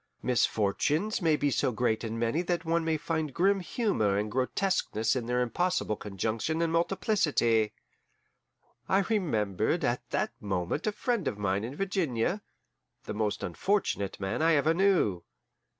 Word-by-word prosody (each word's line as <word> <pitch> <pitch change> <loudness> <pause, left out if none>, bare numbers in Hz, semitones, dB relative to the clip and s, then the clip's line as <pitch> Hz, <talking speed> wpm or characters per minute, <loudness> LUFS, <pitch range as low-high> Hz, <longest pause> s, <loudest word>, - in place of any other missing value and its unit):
Misfortunes 125 - +1
may 160 -3 +3
be 145 -1 0
so 125 - +1
great 110 -1 0
and 115 0 -3
many 115 +8 +1
that 175 -1 -2
one 165 +1 +1
may 160 -1 +1
find 155 -2 -3
grim 195 +3 +3
humour 175 - 0
and 105 +1 -2
grotesqueness 130 - 0
in 120 -3 -2
their 125 0 +1
impossible 175 -1 0
conjunction 110 - -2
and 165 -1 0
multiplicity. 165 - +2 1.2
I 195 - +4
remembered 125 - 0
at - - -2
that - - 0
moment 95 - -2
a - - +3
friend 235 - -1
of 100 - -2
mine 100 0 0
in 125 +5 -5
Virginia, 185 - -1 0.6
the - - -5
most 105 -1 -1
unfortunate 100 - -1
man 95 +7 -2
I 165 0 +4
ever 155 +3 +3
knew. 170 - +2
145 Hz, 150 wpm, -29 LUFS, 110-175 Hz, 1.2 s, I